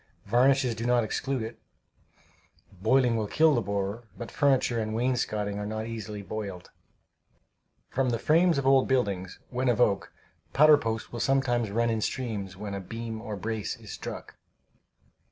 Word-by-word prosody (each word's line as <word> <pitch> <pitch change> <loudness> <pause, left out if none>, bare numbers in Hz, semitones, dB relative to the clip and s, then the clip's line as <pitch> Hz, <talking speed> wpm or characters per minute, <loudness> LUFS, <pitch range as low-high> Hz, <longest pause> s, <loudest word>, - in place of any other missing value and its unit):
Varnishes 125 +3 +3
do 110 +1 -6
not 120 -1 +3
exclude 130 +3 -2
it. 110 +2 -7 1.2
Boiling 125 +2 +3
will 110 -2 -1
kill 155 +7 +4
the 120 - +2
borer, 100 +3 -3
but 115 - -7
furniture 135 -4 +2
and 110 0 -2
wainscotings 110 -4 -1
are 105 - -3
not 110 +1 -3
easily 110 -2 -6
boiled. 100 -4 -6 1.2
From 130 0 0
the 115 - 0
frames 165 +5 +3
of 140 - -1
old 135 -1 +5
buildings, 100 -8 0
when 125 0 0
of 120 - +1
oak, 100 -7 +2 0.4
powder 150 +1 +7
post 110 -3 -3
will 120 - -4
sometimes 120 -4 +1
run 115 +3 +1
in 110 -1 -1
streams 105 -7 -3
when 100 0 -5
a 100 - -3
beam 115 +2 -6
or 110 -2 -5
brace 110 +1 -3
is - - -11
struck. - - -7
115 Hz, 160 wpm, -28 LUFS, 105-130 Hz, 1.2 s, powder